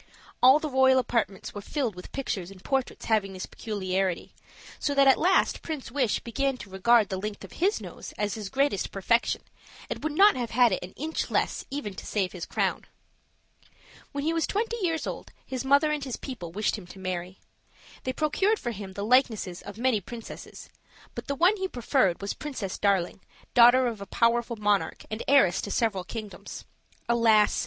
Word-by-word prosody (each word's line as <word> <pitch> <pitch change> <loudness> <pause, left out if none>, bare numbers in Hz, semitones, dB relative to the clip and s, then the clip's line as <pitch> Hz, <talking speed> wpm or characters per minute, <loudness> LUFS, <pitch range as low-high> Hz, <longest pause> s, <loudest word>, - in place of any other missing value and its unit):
All 260 +3 +8
the 310 - -3
royal 265 -1 +4
apartments 230 -6 -1
were 205 - -6
filled 250 0 -2
with 180 0 -11
pictures 200 -10 -3
and 195 -1 -14
portraits 270 -2 -2
having 210 -3 +1
this 185 - -5
peculiarity, 190 -4 -2 0.5
so 285 - -1
that 275 0 +5
at 270 - +8
last 370 +3 +3
Prince 305 -7 -5
Wish 250 -6 +1
began 270 +3 -1
to 205 - -11
regard 215 +3 +4
the 190 - -3
length 210 +1 -5
of - - -10
his 390 +5 +1
nose - - -9
as 210 -1 -2
his 210 -3 -5
greatest 275 -6 0
perfection, 230 +5 +1 0.5
and - - -4
would 310 -1 -1
not 400 +6 +6
have 240 -2 -3
had 240 0 +4
it 185 - -1
an 180 - -9
inch 315 +3 -3
less - - 0
even 275 -8 -4
to - - -9
save 190 -4 0
his 180 -3 -7
crown. - - -1 1.3
When 280 0 -3
he 320 +2 +1
was 330 -2 0
twenty 450 +3 -1
years 330 -3 0
old - - -6
his 260 -1 -4
mother 280 +3 +4
and 300 -2 -2
his 260 -3 -4
people 230 - -7
wished 210 +3 -1
him 180 - -13
to 185 - -12
marry. 185 -1 -5 0.6
They 255 - -1
procured 315 +10 +1
for 240 - -3
him 195 -3 -7
the 200 +1 -4
likenesses 220 -7 +2
of 200 +1 -9
many 240 -3 +1
princesses, 230 +4 -9 0.5
but - - -7
the 280 - -1
one 360 +8 +4
he 380 -1 -1
preferred 245 - +1
was 200 - -2
Princess 260 -11 -5
Darling, 195 -3 +1 0.3
daughter 245 +2 +7
of 230 -4 -3
a 200 - -7
powerful 235 0 +1
monarch 210 -2 0
and 215 +1 -3
heiress 270 -10 +5
to - - -5
several 205 -3 0
kingdoms. 215 +1 -8 0.4
Alas! 225 -3 +4
235 Hz, 190 wpm, -27 LUFS, 200-275 Hz, 1.3 s, All